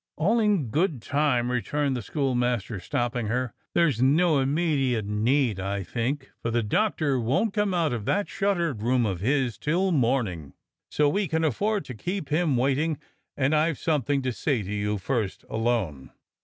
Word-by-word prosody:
"x\ll 210 +9 +3
in 200 - +1
good 160 - +1
time," 125 -1 +1
returned 140 +3 0
the 125 - -3
schoolmaster, 120 -4 -1
stopping 120 +4 -2
her. 125 +2 -1 0.2
"There's 150 -9 +3
no 150 +3 +4
immediate 135 -5 +1
hurry, 115 +3 +1
I 100 +1 -2
think, 130 - -3
for 115 - -2
the 115 0 +1
Doctor 150 - +1
won't 140 - +1
come 210 -2 +1
out 165 -6 +1
of 110 -4 -4
that 205 - +1
shuttered 175 - -1
room 120 +1 +2
of 95 -5 -2
his 125 0 0
till 180 +5 +1
morning, 115 - 0 0.4
so 150 - +2
we 195 +7 +1
can 160 +1 0
afford 200 - 0
to 125 - -7
keep 175 - -4
him 155 -3 +2
waiting, 140 +5 +1 0.4
and 135 +2 +2
I've 155 -1 +2
something 145 -3 0
to 130 -1 -1
say 125 -3 -1
to 100 +2 -5
you 105 0 -1
first 105 -1 -2
— - - -33
alone." 110 - -1
135 Hz, 170 wpm, -26 LUFS, 115-160 Hz, 0.4 s, no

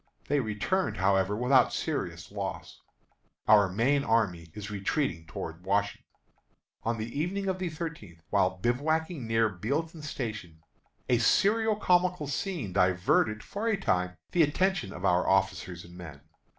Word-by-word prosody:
They 145 0 +3
returned, 110 - -1
however, 95 +1 +2
without 125 +2 +4
serious - - -3
loss. - - -6 0.7
Our 105 -3 +6
main 135 +8 +2
army 105 -9 +1
is 105 0 -6
retreating 100 - -1
toward 80 +2 -7
Washington. 100 +1 -1 0.7
On 115 0 -1
the 115 +5 -4
evening 195 +5 -1
of 185 -1 -1
the 185 -2 -2
thirteenth, 155 - -7
while 95 -2 +2
bivouacking 145 - -1
near 115 0 +3
Bealeton 140 - -3
Station, 105 - -6 0.4
a 120 -2 +3
serio 215 - +3
comical 180 -4 +2
scene 140 - -3
diverted 95 +3 +2
for 210 +3 -4
a 220 -3 +2
time 90 - 0
the 175 - +3
attention 170 - +1
of 90 +1 -6
our 90 -1 +3
officers 85 -2 0
and 85 0 -14
men. 80 -5 -10
115 Hz, 140 wpm, -29 LUFS, -, 0.7 s, Our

